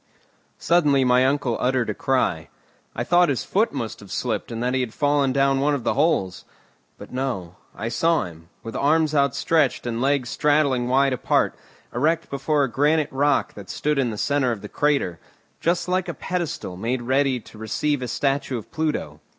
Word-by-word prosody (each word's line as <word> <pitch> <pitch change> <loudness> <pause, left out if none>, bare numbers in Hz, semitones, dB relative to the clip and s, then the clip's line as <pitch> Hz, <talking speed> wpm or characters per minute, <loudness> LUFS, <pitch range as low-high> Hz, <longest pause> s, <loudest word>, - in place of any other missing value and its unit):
Suddenly 150 -6 +3
my 125 +1 +4
uncle 135 -4 0
uttered 125 -1 +1
a - - -3
cry. 100 -11 0 0.5
I - - -1
thought 175 -1 +4
his 135 -5 -1
foot - - +1
must - - -5
have - - -13
slipped - - -2
and 115 +1 -3
that 125 +1 0
he 130 - +1
had 120 -3 -4
fallen 145 -2 +2
down 135 0 +2
one 145 +1 +2
of 135 - -5
the - - +1
holes. 140 - +1 0.5
But, - - -11
no; 100 -10 -3 0.2
I 110 - -4
saw 165 +8 +2
him, 85 -1 -11
with 115 - -7
arms 155 +2 +2
outstretched 140 0 +1
and 120 -1 -2
legs 135 -2 +1
straddling 145 -5 +2
wide 135 +1 +3
apart, 125 - +1 0.4
erect 160 +6 0
before 140 +1 +1
a - - +1
granite 150 +4 +1
rock 145 +1 +1
that 100 -2 -11
stood 150 -1 -1
in 130 -3 +1
the 110 - -5
centre 140 +1 +1
of 110 -3 -5
the 105 - -7
crater, 140 - 0 0.4
just 175 +2 0
like 185 0 0
a - - -4
pedestal 170 - -4
made 120 +5 -2
ready 130 +1 +1
to 110 - -15
receive 130 +6 -1
a 125 - -3
statue 135 +1 -1
of 110 - -10
Pluto. 150 - -2
135 Hz, 190 wpm, -23 LUFS, 120-150 Hz, 0.5 s, my